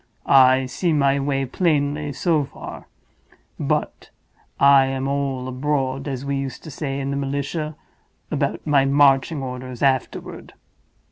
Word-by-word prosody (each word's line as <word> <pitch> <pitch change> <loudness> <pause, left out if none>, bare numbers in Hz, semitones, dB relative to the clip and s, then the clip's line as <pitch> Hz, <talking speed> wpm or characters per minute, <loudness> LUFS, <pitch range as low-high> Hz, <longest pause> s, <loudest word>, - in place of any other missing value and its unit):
I 130 -1 +5
see 165 +6 -1
my 140 -1 +2
way 135 -1 -1
plainly 145 0 0
so 155 +1 +1
far; - - -10 0.7
but - - -2 0.5
I 140 -1 +6
am 135 0 -2
all 135 -2 -2
abroad, 135 0 -2
as 135 -1 -4
we 140 0 -1
used 135 -1 -5
to 155 - -9
say 140 -1 -4
in 135 0 -3
the - - -2
militia, 140 +3 -3 0.6
about - - -2
my 145 -3 +4
marching 140 +1 +3
orders 125 -1 -6
afterward. 130 -3 -1
140 Hz, 135 wpm, -22 LUFS, 135-145 Hz, 0.7 s, I